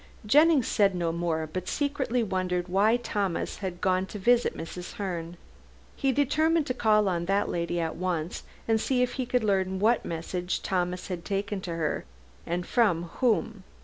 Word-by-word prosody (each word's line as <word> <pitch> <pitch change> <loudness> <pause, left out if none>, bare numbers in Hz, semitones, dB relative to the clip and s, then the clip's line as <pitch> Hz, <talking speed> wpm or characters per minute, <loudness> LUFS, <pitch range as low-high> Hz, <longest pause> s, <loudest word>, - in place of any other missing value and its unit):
Jennings 295 +3 +5
said 200 -3 +3
no 170 -2 0
more, 165 -1 -1
but 185 0 -4
secretly 265 -4 0
wondered 185 -3 -1
why 205 +6 +3
Thomas 200 -7 -2
had 185 -3 -5
gone 185 0 +1
to 210 - -7
visit 240 +4 +2
Mrs. 175 +2 -7
Herne. 175 -4 -4 0.6
He 270 - +1
determined 310 +4 +2
to 255 - -1
call 215 -4 +3
on 170 -2 0
that 195 +2 +1
lady 170 0 -1
at 165 -1 -2
once 175 -2 -2 0.3
and 225 -1 +2
see 250 0 +2
if 245 - -1
he 255 -2 -3
could 250 -1 +1
learn 190 -2 +1
what 225 +5 +3
message 175 +2 -3
Thomas 180 0 -1
had 175 -2 -4
taken 200 0 -2
her 165 -3 -2 0.4
and 175 +1 -2
from 200 -9 +2 0.2
whom. 225 -4 +1
190 Hz, 170 wpm, -28 LUFS, 175-235 Hz, 0.6 s, Jennings